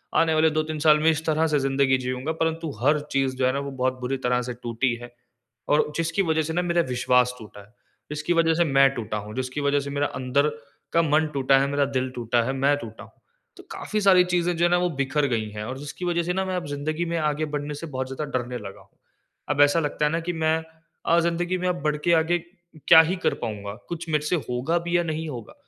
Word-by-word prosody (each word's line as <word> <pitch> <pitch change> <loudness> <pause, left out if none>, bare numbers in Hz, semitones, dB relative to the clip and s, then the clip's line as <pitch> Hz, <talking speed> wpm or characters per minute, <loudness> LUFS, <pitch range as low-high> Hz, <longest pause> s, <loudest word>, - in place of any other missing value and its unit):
आने 165 -1 +3
वाले 155 0 +4
2-3 155 0 -2
साल 150 0 +5
में 160 +1 +4
इस 160 0 -3
तरह 160 0 +2
से 150 -2 +1
जिंदगी 135 -1 +2
जिऊँगा। 130 +4 -2
परंतु 160 -1 -2
हर 150 +3 +3
चीज़ 135 -1 0
जो 130 - +1
है 130 - +1
ना 140 - -1
वो 140 0 -5
बहुत 130 -1 -1
बुरी 130 +2 -2
तरह 125 0 +2
से - - -3
टूटी 120 +1 0
है। 120 - -10 0.6
और 150 0 +2
जिसकी 165 +4 0
वज़ह 160 -2 +1
से 160 +1 -4
ना 180 - +1
मेरा 175 -1 +1
विश्वास 125 0 +2
टूटा 105 -2 -12
है, 100 - -17 0.4
जिसकी 150 +3 -1
वज़ह 165 -1 +3
से 170 - +3
मैं 135 -2 +5
टूटा 110 -2 -4
हूँ, 105 +1 -7
जिसकी 130 +3 -3
वज़ह 145 0 +2
से 140 - -6
मेरा 145 +1 0
अंदर 130 +3 +1 0.5
का 165 - +5
मन 155 0 +2
टूटा 135 0 +3
है, 135 - +1
मेरा 145 0 +1
दिल 130 -1 -2
टूटा 120 0 +1
है, 135 - -1
मैं 140 +2 +2
टूटा 115 -5 -9
हूँ। - - -15 0.5
तो - - -12
काफ़ी 215 -1 -3
सारी 190 -2 +6
चीज़े 175 -1 0
जो 170 0 +1
है 175 - +3
ना 175 - +4
वो 180 0 +1
बिखर 140 +2 +1
गई 110 -4 -1
हैं 105 0 -6
और 130 +4 -5
जिसकी 145 +5 -7
वज़ह 170 -1 0
से 180 +1 -1
ना 190 +1 -1
मैं 185 -1 -2
अब 180 - -3
जिंदगी 155 +4 -3
में 170 0 -2
आगे 155 -1 0
बढ़ने 145 0 -3
से 165 +3 -7
बहुत 130 -3 -4
ज़्यादा 150 +3 -4
डरने 125 0 -5
लगा 100 -4 -9
हूँ। - - -25 0.5
अब 145 - +2
ऐसा 145 +3 +5
लगता 150 -1 -1
है 150 - +1
ना 165 - 0
कि 175 - 0
मैं 160 0 +1 0.5
अ, 170 +1 +4
जिंदगी 175 +2 0
में 180 0 -2
अब 175 -3 -2
बढ़ 150 0 +1
के 170 - +4
आगे 165 +2 +2 0.5
क्या 160 - +10
ही 185 - 0
कर - - +3
पाऊँगा? 100 -2 -5 0.2
कुछ 170 -1 -5
मेरे 150 -1 0
से 180 - +1
होगा 130 +8 0
भी 175 0 +1
या 175 - +1
नहीं 160 -1 -3
होगा? 120 -6 -8
150 Hz, 250 wpm, -24 LUFS, 130-165 Hz, 0.6 s, क्या